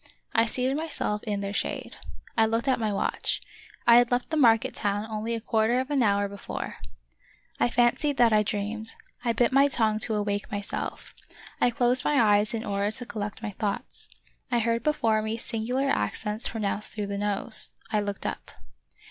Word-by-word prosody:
I 225 0 +3
seated 255 +3 0
myself 295 -9 -2
in 205 -2 -2
their 200 0 -4
shade. - - -3 0.4
I 225 -1 +4
looked 230 +2 -1
at 260 - +2
my 215 -2 0
watch; 200 - -1 0.5
I 235 0 +8
had 245 -1 +2
left 245 +4 -1
the - - 0
market 230 -7 +4
town 205 0 -1
only 220 +1 -3
a - - -3
quarter 225 +2 +1
of 260 +3 -3
an 280 -2 +2
hour 200 -2 +2
be 200 0 -9
fore. - - -6 0.8
I - - +3
fancied 245 +4 +2
that 235 -2 +5
I 210 - +5
dreamed; 210 +2 -3 0.3
I 240 - +2
bit 235 +2 +2
my 275 +2 +5
tongue 220 -5 +2
to 220 0 +1
awake 205 +1 -2
myself. 205 -1 -5 0.5
I - - +4
closed 245 0 +3
my 295 - +2
eyes 210 0 +3
in 225 +1 -4
order 200 0 0
to 220 +3 0
collect 210 -1 -5
my 215 - -3
thoughts. 200 +1 -4 0.4
I 245 - +1
heard 230 0 +1
before 230 -8 +1
me 220 +1 -3
singu 225 +1 -3
lar 275 +1 +1
accents 210 - -1
pronounced 210 -2 -2
through 210 -1 -3
the 200 0 -4
nose. 205 +2 +2 0.2
I 215 - +2
looked 200 -1 -4
up. - - -4
220 Hz, 190 wpm, -27 LUFS, 210-240 Hz, 0.8 s, I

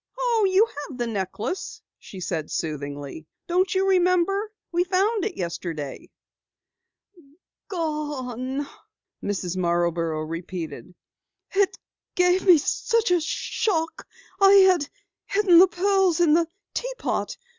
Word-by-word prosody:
"Oh, 470 -4 +2
you 390 +4 +5
have 290 - -8
the 240 - -1
necklace," 215 - -4 0.2
she 190 - -11
said 165 -4 -3
soothingly. 145 -1 -5 0.2
"Don't 370 +2 +1
you 380 +1 +2
remember? 375 +3 +2 0.2
We 350 0 +2
found 390 +3 +1
it 410 -5 -4
yesterday." 165 -5 -5 1.6
"Gone 290 - -3 0.3
" - - -37
Mrs. 185 -3 -3
Marborough 170 -2 0
repeated. 170 +1 -6 0.6
"It 400 -1 +1 0.4
gave 360 +2 +2
me 355 -3 +9
such 455 - 0
a 355 -1 +3
shock 325 +1 -2 0.3
I 390 -1 +7 0.2
had 310 -6 -1 0.4
hidden 395 -4 +5
the 375 - +8
pearls 380 -1 +2
in 335 -3 +4
the 335 +1 +3 0.3
teapot. - - -3
330 Hz, 115 wpm, -24 LUFS, -, 1.6 s, me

